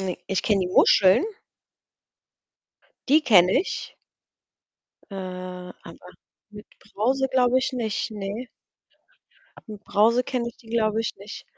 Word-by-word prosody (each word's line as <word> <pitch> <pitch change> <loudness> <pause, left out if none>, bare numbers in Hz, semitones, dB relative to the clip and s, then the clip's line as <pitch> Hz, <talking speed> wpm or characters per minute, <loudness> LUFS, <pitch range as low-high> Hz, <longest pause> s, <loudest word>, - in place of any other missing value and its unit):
ne, 185 -2 -3
ich 195 - -1
kenne 205 -3 +1
die 180 - -2
Muscheln. 190 - +5 1.8
Die 305 +4 +5
kenne 185 -8 +5
ich. 385 - -5 1.2
Äh, - - -9
aber 185 -1 -9 0.4
mit 210 0 -12 0.3
Brause 265 +5 0
glaube 255 -1 +3
ich 265 +1 -2
nicht, 230 -2 -3
ne. 210 +4 -6 1.2
Mit 210 -1 -10
Brause 230 +4 +2
kenne 240 -2 -3
ich 235 - -13
die 225 - -20
glaube 220 -2 0
ich 225 - -3
nicht. 200 +2 -10
215 Hz, 125 wpm, -24 LUFS, 195-245 Hz, 1.8 s, Muscheln